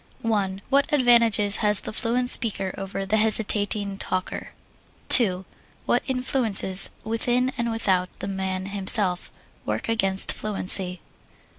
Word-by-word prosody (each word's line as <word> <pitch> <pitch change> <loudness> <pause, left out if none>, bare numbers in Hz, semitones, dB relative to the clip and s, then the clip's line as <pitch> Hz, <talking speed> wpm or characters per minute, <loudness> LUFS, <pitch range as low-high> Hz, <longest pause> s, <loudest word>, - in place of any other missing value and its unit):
What 215 +6 -3
advantages 235 -7 +2
has 210 -2 0
the - - -9
fluent 245 +2 0
speaker 195 -5 +3
over 195 0 -7
the 210 +3 -2
hesitating 205 -2 0
talker? 185 0 -5 0.6
2. 190 -6 +4 0.4
What - - -1
influences, 250 -7 +4
within 245 +3 -2
and 235 0 -4
without 190 -5 -2
the - - -8
man 190 -1 -6
himself, 195 -2 0 0.3
work - - -6
against 195 -4 -2
fluency? 185 -3 +2
205 Hz, 115 wpm, -21 LUFS, 190-230 Hz, 0.6 s, 2